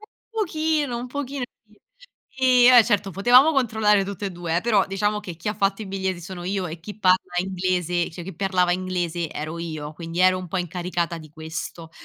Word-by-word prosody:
Un 430 - -16 0.2
pochino, 315 - 0
un 245 - -5
pochino, 275 0 -4 0.8
sì. 255 -2 +4
Ehm, 255 - +8
eh 225 - +7
certo 200 -1 +1
potevamo 245 - +5
controllare 220 -7 +2
tutt'e 200 0 -4
due, 170 -2 -3
eh, - - +2
però 215 -3 +2
diciamo 205 +2 -1
che 180 -5 -7
chi 170 - -5
ha 210 - -1
fatto 195 +1 0
i 205 - -7
biglietti 190 -2 -3
sono 175 0 -8
io 190 0 -1
e 165 0 -7
chi 210 +5 -9
parla 185 -2 +2
inglese 180 -2 -1
cioè, 170 +1 -8
chi 190 - -8
parlava 185 -2 +1
inglese 175 -3 -2
ero 155 +2 -5
io 155 -3 -5
quindi 165 +1 -7
ero 185 0 +5
un 185 -1 -7
po' 190 - -2
incaricata 175 -1 -2
di 155 -2 -13
questo. 160 +1 -7
185 Hz, 200 wpm, -23 LUFS, 175-215 Hz, 0.8 s, Ehm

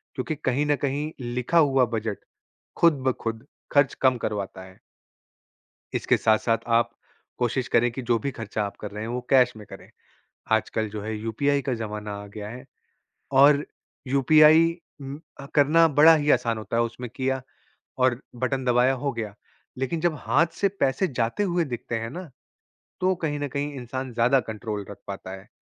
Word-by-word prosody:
क्योंकि 140 +4 -3
कहीं 130 +3 +1
न 145 - +3
कहीं 145 +3 -2
लिखा 125 +6 -1
हुआ 135 -5 +5
बजट 110 -2 -3 0.6
खुद 160 -6 +4
ब 130 - +3
खुद 115 +2 -4 0.3
ख़र्च 140 -2 +4
कम 130 -1 +4
करवाता 100 -4 -4
है। 95 0 -16 1.2
इसके - - +2
साथ-साथ 110 +1 +2 0.2
आप 115 0 +1 0.5
कोशिश 125 0 -1
करें 120 +1 +3
कि 130 - -6
जो 120 -1 +1
भी 140 +5 -3
खर्चा 110 -3 -4
आप 100 -1 -6
कर 105 - -6
रहे 105 +1 -6
हैं, 110 - -5
वो 125 +1 -3
कैश 125 -2 +5
में 105 - -11
करे। - - -12 0.6
आजकल 110 0 0
जो 105 0 -6
है, 110 +1 -4
यूपीआई 140 +6 0
का 130 -3 -1
ज़माना 105 -2 -5
आ - - -10
गया 105 0 -5
है 125 +4 -9 0.8
और 145 +1 +6 0.4
यूपीआई 155 +5 +6 0.3
उम, 135 +2 -7 0.2
अ, 140 - -8
करना 155 +3 +5
बड़ा 160 +2 +9
ही 150 -1 0
आसान 120 -4 +2
होता 110 +1 -4
है, 115 - +3
उसमे 120 +1 -5
किया 130 +2 -2 0.6
और 125 -1 +2 0.2
बटन 130 +1 -1
दबाया, 125 +1 +3
हो 135 +2 -2
गया। 110 -3 -5 0.4
लेकिन 135 +5 -2
जब 175 -1 +1
हाथ 165 +5 +2
से 200 - +4
पैसे 135 +8 +2
जाते 115 - 0
हुए 175 -3 +1
दिखते 120 -4 -4
हैं 115 0 -5
ना, 175 -2 -8 0.7
तो 185 +1 +2
कहीं 145 -2 -1
न 145 - -2
कहीं 145 +1 -2
इंसान 130 0 -5
ज़्यादा 120 +4 +3
कंट्रोल 105 -2 -4
रख 100 - -9
पाता 95 -1 -7
है 95 +2 -10
125 Hz, 180 wpm, -25 LUFS, 115-145 Hz, 1.2 s, बड़ा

